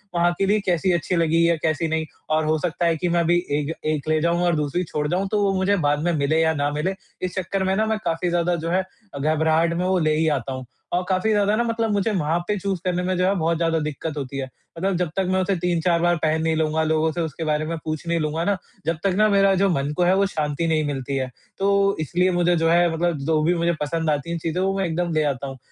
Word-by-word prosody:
वहाँ 175 0 +3
के 195 - +1
लिए 210 +2 +2
कैसी 180 +1 +1
अच्छी 175 +2 -1
लगी 165 0 +3
या 170 - +3
कैसी 160 +1 0
नहीं, 160 0 -1 0.2
और 155 0 +1
हो 155 +1 +2
सकता 175 +1 -1
है 165 -1 +3
कि 175 +3 -1
मैं 170 - +2
अभी 170 +1 +3 0.2
एक 150 +2 -2 0.2
एक 150 0 -4
ले 155 - +3
जाऊँ 170 +1 +1
और 175 -2 +2
दूसरी 150 +4 -1
छोड़ 150 -3 -2
जाऊँ 185 +5 0
तो 210 - +1
वो 195 -1 +2
मुझे 190 +2 +2
बाद 145 0 +2
में 175 - +1
मिले 145 +3 +1
या 160 0 +3
ना 145 -1 0
मिले, 155 +6 -2 0.3
इस 185 -1 -3
चक्कर 190 +1 -2
में 190 0 +1
ना 215 +2 +1
मैं 220 0 0
काफ़ी 170 +2 0
ज़्यादा 175 0 +1
जो 165 0 -4
है 185 +1 +2 0.4
घबराहट 160 +3 +2
में 175 +2 -1
वो 185 0 +2
ले 155 -1 +2
ही 160 +1 +1
आता 130 +2 -5
हूँ। 130 -1 -6 0.3
औ 180 - +2
काफ़ी 185 +4 +1
ज़्यादा 205 0 +2
ना 235 - +1
मतलब 230 -1 -1
मुझे 205 +2 +1
वहाँ 165 -4 0
पे 210 - 0
चूज़ 195 -1 -2
करने 180 0 0
में 185 0 0
जो 180 - +2
है 195 - +3
बहुत 165 -2 0
ज़्यादा 165 -1 +1
दिक्कत 150 0 -4
होती 135 -1 -5
है। 135 - -2 0.3
मतलब 190 +2 0
जब 180 -2 -1
तक 195 - +1
मैं 185 0 +2
उसे 190 +1 0
3-4 170 -1 +1
बार 175 0 +3
पहन 160 0 +2
नहीं 160 0 +1
लूँगा 160 0 +1
लोगों 160 0 +1
से 170 +2 -3
उसके 160 0 -4
बारे 155 0 0
में 165 +1 -3
पूछ 155 +1 -4
नहीं 170 0 +1
लूँगा 155 +2 -1
ना, 200 0 +1 0.3
जब 165 +1 0
तक 195 -2 +2
ना 215 0 +5
मेरा 195 -1 +4
जो 195 +1 +2
मन 140 -4 0
को 180 - +3
है 180 +2 +4
वो 200 - +3
शांति 155 -3 -2
नहीं 160 -1 +1
मिलती 135 -1 -3
है, 130 -1 -2 0.3
तो 200 0 +2
इसलिए 180 +4 +1
मुझे 175 0 +2
जो 165 0 +2
है 170 0 +4
मतलब 170 0 0
जो 155 +2 +1
भी 175 +2 +2
मुझे 170 0 +1
पसंद 160 +1 -1
आती 150 +3 -1
है 170 - -1
चीज़ें 165 +2 -2
वो 195 +1 0
मैं 195 - 0
एकदम 170 +1 -1
ले 155 -1 +2
आता 140 -2 -2
हूँ। 135 0 -7
170 Hz, 275 wpm, -23 LUFS, 155-185 Hz, 0.4 s, ना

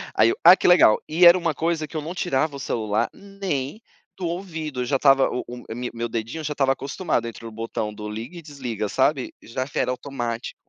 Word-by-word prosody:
aí 110 - +5
eu: - - -1
"Ah, 175 +2 +10
que - - +1
legal", 175 -11 +6
e 165 +3 +4
era 170 +1 +9
uma 170 -3 0
coisa 165 -1 -1
que 160 - -6
eu - - -2
não 160 +4 -5
tirava 155 -4 0
o - - -7
celular 110 -4 -1
nem 195 - -4 0.4
do 180 - -3
ouvido. 165 -6 -4
Eu - - -1
já 135 +2 +1
estava 135 -1 +5
o 125 - -3
o 120 -2 -8
me 125 0 -4
meu 120 0 -3
dedinho 115 +8 -4
já 150 0 -2
estava 135 -2 +2
acostumado 135 -2 -2
entre 115 0 -9
o 115 - -7
botão 110 -1 -4
do 105 0 -7
liga 115 +10 -7
e - - -8
desliga, 130 -9 -4
sabe, 135 +2 +1
já 130 +3 -4
que - - -4
era - - +1
automático. 125 -3 -4
135 Hz, 230 wpm, -23 LUFS, 115-160 Hz, 0.4 s, Ah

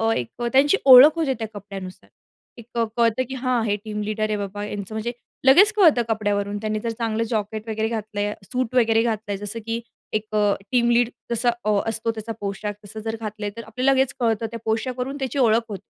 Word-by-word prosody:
एक 125 - -5
त्यांची 290 +8 +5
ओळख 270 +4 +10
होते 290 -5 +1
त्या 225 - -3
कपड्यानुसार. 195 -2 -9 0.5
एक 235 +1 -11 0.2
कळतं 235 +2 +2
की 265 - -4
हा 255 -2 0
हे 205 - +1
टीम 210 -1 -4
लीडर 215 +1 -2
आहे 210 - 0
बाबा 205 +1 -5
यांचं 205 0 -6
म्हणजे 225 +2 -2 0.3
लगेच 360 +11 +7
कळतं 330 - +5
कपड्यावरून 205 -2 -1
त्यांनी 215 0 -2
जर 230 - -1
चांगलं 225 0 0
जॅकेट 215 -1 -3
वगैरे 220 0 -1
घातलंय, 210 -2 -3
सूट 255 +3 -3
वगैरे 225 -2 +4
घातलंय 215 -3 -2
जसं 205 +3 -5
की 230 +1 -2 0.3
एक 215 0 -1
अ, 205 -1 +3 0.2
टीम 240 -1 +3
लीड 235 0 +3 0.2
जसा 240 +1 +2 0.4
असतो 225 +1 0
त्याचा 225 0 -6
पोशाख 205 +1 -3
तसं 215 +2 -8
जर 225 0 -2
घातलंय 210 -1 -4
तर 230 - -6
आपल्याला 255 +5 +1
लगेच 265 0 +2
कळतं 225 -2 +1
त्या 230 - -6
पोशाखावरून 250 +4 -2
त्याची 265 +1 -2
ओळख 230 -2 +4
होते. 200 -2 -6
225 Hz, 190 wpm, -23 LUFS, 210-245 Hz, 0.5 s, ओळख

